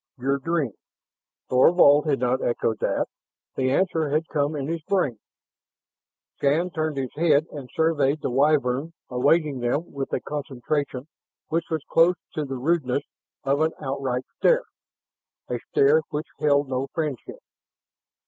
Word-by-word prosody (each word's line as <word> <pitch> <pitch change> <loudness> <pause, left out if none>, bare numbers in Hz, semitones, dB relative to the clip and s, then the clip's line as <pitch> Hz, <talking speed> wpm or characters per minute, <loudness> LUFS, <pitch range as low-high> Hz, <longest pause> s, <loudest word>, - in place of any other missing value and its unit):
"Your 135 +2 0
dream." 155 -3 -1 0.8
Thorvald 145 +2 +5
had 140 -2 +2
not 125 +1 +1
echoed 115 -2 0
that; - - 0 0.5
the 130 -1 +1
answer 160 0 +1
had 155 +3 0
come 145 0 0
in 140 -2 -3
his 165 +1 -3
brain. 150 - 0 1.2
Shann 160 +6 +1
turned 155 -3 -2
his 130 -2 -3
head 155 -2 +3
and 140 -4 -8
surveyed 155 -3 +1
the - - -1
Wyvern 140 +2 +2 0.2
awaiting 140 +2 +2
them 125 +7 -1
with 135 -1 -4
a - - 0
concentration 140 -1 -3 0.4
which 165 +1 0
was 160 -3 -2
close 170 +2 +4 0.2
to 155 - -2
the 135 -1 -5
rudeness 140 -1 0 0.4
of 140 +2 +1
an 160 +1 +2
outright 135 -3 -2 0.2
stare, - - +4 0.8
a - - -3
stare 435 +3 +4
which 150 +1 -3
held 145 -2 +3
no 130 +1 -2
friendship. 150 -7 -3
145 Hz, 140 wpm, -24 LUFS, 135-160 Hz, 1.2 s, Thorvald